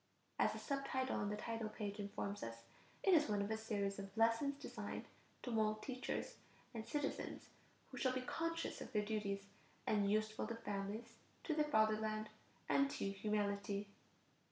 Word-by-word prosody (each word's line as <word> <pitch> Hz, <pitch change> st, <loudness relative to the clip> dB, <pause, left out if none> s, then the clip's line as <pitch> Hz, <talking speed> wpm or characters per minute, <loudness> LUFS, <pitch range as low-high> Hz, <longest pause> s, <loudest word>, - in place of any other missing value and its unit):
As -, -, +5 dB
the -, -, -4 dB
sub 275 Hz, -1 st, -1 dB
title 260 Hz, 0 st, +1 dB
on 205 Hz, -, +1 dB
the 210 Hz, -, 0 dB
title 225 Hz, 0 st, -2 dB
page 210 Hz, -1 st, -4 dB
informs 200 Hz, 0 st, -2 dB
us, 115 Hz, 0 st, -5 dB, 0.4 s
it 385 Hz, -, +6 dB
is 305 Hz, -7 st, +6 dB
one 205 Hz, -1 st, +3 dB
of 200 Hz, +2 st, 0 dB
a -, -, +3 dB
series 205 Hz, -3 st, -1 dB
of 195 Hz, 0 st, -4 dB
"lessons 230 Hz, +5 st, +4 dB
designed -, -, -4 dB, 0.4 s
to 245 Hz, -, -2 dB
mold 215 Hz, -1 st, +2 dB
teachers 255 Hz, -1 st, -2 dB, 0.4 s
and 225 Hz, -1 st, -4 dB
citizens 295 Hz, -2 st, -2 dB, 0.4 s
who 255 Hz, -, -5 dB
shall 255 Hz, -, +4 dB
be 255 Hz, 0 st, 0 dB
conscious 330 Hz, +5 st, -1 dB
of -, -, -6 dB
their 210 Hz, -1 st, +3 dB
duties, 205 Hz, -2 st, 0 dB, 0.4 s
and 205 Hz, -2 st, +3 dB
useful 215 Hz, +1 st, +2 dB
to 230 Hz, -, -2 dB
families, 205 Hz, 0 st, -3 dB, 0.3 s
to 320 Hz, -, +1 dB
their 305 Hz, 0 st, +3 dB
fatherland, 215 Hz, -4 st, +3 dB, 0.4 s
and 275 Hz, 0 st, +5 dB
to 200 Hz, -7 st, -1 dB
humanity." 200 Hz, 0 st, 0 dB
215 Hz, 170 wpm, -41 LUFS, 205-255 Hz, 0.4 s, it